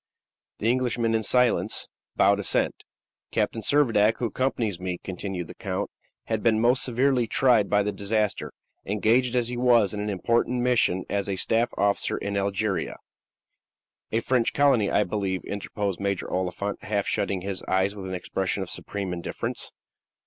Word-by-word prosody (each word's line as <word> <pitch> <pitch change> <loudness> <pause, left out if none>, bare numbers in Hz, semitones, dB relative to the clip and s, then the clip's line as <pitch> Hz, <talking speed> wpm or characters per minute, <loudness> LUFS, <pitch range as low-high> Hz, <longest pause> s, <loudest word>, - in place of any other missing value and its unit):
The 110 - -2
Englishmen, 120 -2 0
in 110 - +2
silence, 110 -4 +1 0.3
bowed 100 0 +4
assent. 100 - +2 0.6
"Captain 115 - -1
Servadac, 115 -5 +3
who 125 - -2
accompanies 115 -5 -1
me," 90 -1 -3
continued 95 -1 -4
the - - -10
count, - - -4 0.3
"has 110 -1 -1
been 110 0 +2
most 120 +3 +3
severely 125 0 +2
tried 115 -3 +3
by 105 0 +3
the 105 - -1
disaster. 105 +1 -1 0.3
Engaged 115 +5 +2
as 120 -1 +1
he 125 - -4
was 120 -5 +4
in 105 - -4
an 105 +1 -2
important 115 +5 +1
mission 115 -7 +2
as 100 -1 -2
a 95 - 0
staff 115 +5 +1
officer 100 0 +1
in 100 0 -3
Algeria 100 0 -1 0.6
" - - -57
"A 115 - +1
French 125 -1 +1
colony, 135 -8 +3
I - - +3
believe," 95 -1 -2
interposed 100 -2 -3
Major 100 -1 -1
Oliphant, 95 +2 -2
half 100 -1 -1
shutting 100 -1 -1
his 95 0 -4
eyes 95 +2 +1
with 95 -2 -7
an 95 - -3
expression 95 +2 -2
of 90 - -3
supreme 100 -3 -3
indifference. 85 -1 -4
105 Hz, 165 wpm, -26 LUFS, 100-120 Hz, 0.6 s, bowed